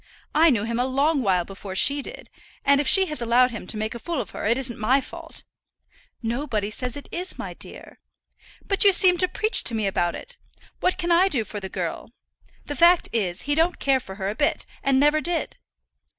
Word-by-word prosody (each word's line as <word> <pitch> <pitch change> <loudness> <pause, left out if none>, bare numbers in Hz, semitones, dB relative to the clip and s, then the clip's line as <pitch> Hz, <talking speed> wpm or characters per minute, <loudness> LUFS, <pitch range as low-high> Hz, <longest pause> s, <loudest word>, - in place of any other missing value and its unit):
I 330 +2 +5
knew 225 -7 +1
him 230 +1 -2
a 250 - +1
long 280 +3 +1
while 185 -6 +1
before 195 0 -9
she 285 +8 +4
did, - - -9 0.3
and 280 0 +4
if 290 - -4
she 385 +5 +6
has 300 -7 -5
allowed 245 +2 +3
him 225 -5 -8
to 215 - -3
make 215 +1 -3
a 235 - -7
fool 335 +3 -3
of 225 - -5
her, - - -4
it 230 +3 +2
isn't 260 -3 -2
my 250 +6 +3
fault." 325 +4 -8 0.8
"Nobody 225 -3 -2
says 250 +3 -4
it 285 - -10
is, 360 +2 -5
my - - -6
dear." - - -12 0.7
"But 395 - +1
you 400 -1 +6
seem 360 -1 +5
to 365 - +3
preach 435 +4 +2
to 235 - +2
me 215 -2 -1
about 175 -3 0
it. - - -8 0.4
What 365 - 0
can 345 0 -2
I 350 +3 +5
do 270 -12 +1
for 210 - -6
the 190 -1 -7
girl? - - -5 0.6
The 290 - -5
fact 340 +4 +4
is, 195 -5 -2
he 290 - -1
don't 330 +4 +1
care 270 -1 +2
for 190 -6 -10
her 190 -1 -4
a - - -2
bit, 290 +6 0 0.2
and 270 -1 +2
never 295 +2 +3
did." 345 +1 -2
265 Hz, 220 wpm, -24 LUFS, 220-330 Hz, 0.8 s, she